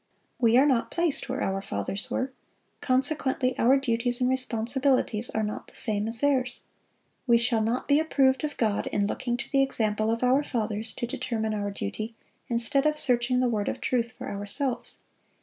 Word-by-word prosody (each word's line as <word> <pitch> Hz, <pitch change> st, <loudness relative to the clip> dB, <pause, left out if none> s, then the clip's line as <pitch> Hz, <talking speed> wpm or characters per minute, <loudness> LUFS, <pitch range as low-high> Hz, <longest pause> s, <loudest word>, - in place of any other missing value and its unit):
We 235 Hz, -1 st, +4 dB
are 270 Hz, -, +6 dB
not 255 Hz, -5 st, +2 dB
placed 335 Hz, -4 st, 0 dB
where -, -, -2 dB
our 195 Hz, 0 st, -1 dB
fathers 145 Hz, -, -3 dB
were; 260 Hz, +1 st, -2 dB, 0.5 s
consequently 260 Hz, -1 st, 0 dB
our 260 Hz, +4 st, +5 dB
duties 245 Hz, -1 st, -1 dB
and 250 Hz, -, +2 dB
responsibilities 255 Hz, -1 st, +1 dB
are 220 Hz, -, -1 dB
not 210 Hz, 0 st, -4 dB
the -, -, -14 dB
same 210 Hz, -2 st, 0 dB
as 225 Hz, 0 st, 0 dB
theirs. 260 Hz, -4 st, +1 dB, 0.7 s
We 235 Hz, -1 st, +6 dB
shall 235 Hz, -1 st, +2 dB
not 230 Hz, +3 st, -1 dB
be 285 Hz, +1 st, +4 dB
approved 270 Hz, -3 st, +2 dB
of 295 Hz, -1 st, -3 dB
God 215 Hz, -3 st, 0 dB
in 205 Hz, -, 0 dB
looking 240 Hz, +3 st, -2 dB
to 260 Hz, -, -7 dB
the 275 Hz, -, +4 dB
example 215 Hz, -5 st, 0 dB
of 230 Hz, +2 st, -1 dB
our 255 Hz, +3 st, +4 dB
fathers 220 Hz, -4 st, -3 dB
to 240 Hz, -, -3 dB
determine 230 Hz, -4 st, -2 dB
our 205 Hz, -1 st, -2 dB
duty 215 Hz, -, -5 dB, 0.3 s
instead 240 Hz, +5 st, +2 dB
of 305 Hz, 0 st, +1 dB
searching 250 Hz, -3 st, +2 dB
the 255 Hz, -, +2 dB
Word 215 Hz, -4 st, -1 dB
of -, -, -4 dB
truth 240 Hz, -1 st, -1 dB
for -, -, -8 dB
ourselves. 205 Hz, +6 st, -3 dB
240 Hz, 185 wpm, -27 LUFS, 220-265 Hz, 0.7 s, are